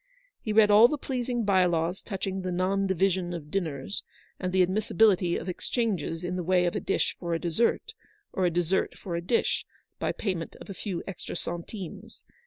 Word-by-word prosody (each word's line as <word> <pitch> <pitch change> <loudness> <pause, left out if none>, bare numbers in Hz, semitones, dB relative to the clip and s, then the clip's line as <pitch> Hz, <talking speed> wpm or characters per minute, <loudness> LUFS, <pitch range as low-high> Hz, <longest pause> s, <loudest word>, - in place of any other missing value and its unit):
He 215 - -3
read 210 -1 +6
all 215 +3 +9
the 300 - -2
pleasing 245 -4 -2
by 190 -2 +4
laws 170 +1 0
touching 195 -2 -3
the 185 0 -3
non 190 +2 +1
division 185 -1 +1
of 150 -3 -8
dinners, 165 -3 -3 0.4
and 185 -1 -2
the 185 0 +5
admissibility 190 -1 +3
of - - -6
exchanges 180 - -2
in 180 +1 -2
the 180 - -2
way 180 +1 +3
of 175 - 0
a - - +1
dish - - 0
for 170 -2 -1
a - - -1
dessert, 230 - 0 0.4
or 185 -1 +2
a - - +3
dessert 175 +2 0
for 175 -3 -5
a 170 - -1
dish, 200 +7 +1 0.4
by - - 0
payment 180 -5 -3
of - - -10
a - - -4
few 190 -2 -4
extra 195 - -6
centimes. 190 +5 -7
185 Hz, 195 wpm, -28 LUFS, 175-205 Hz, 0.4 s, all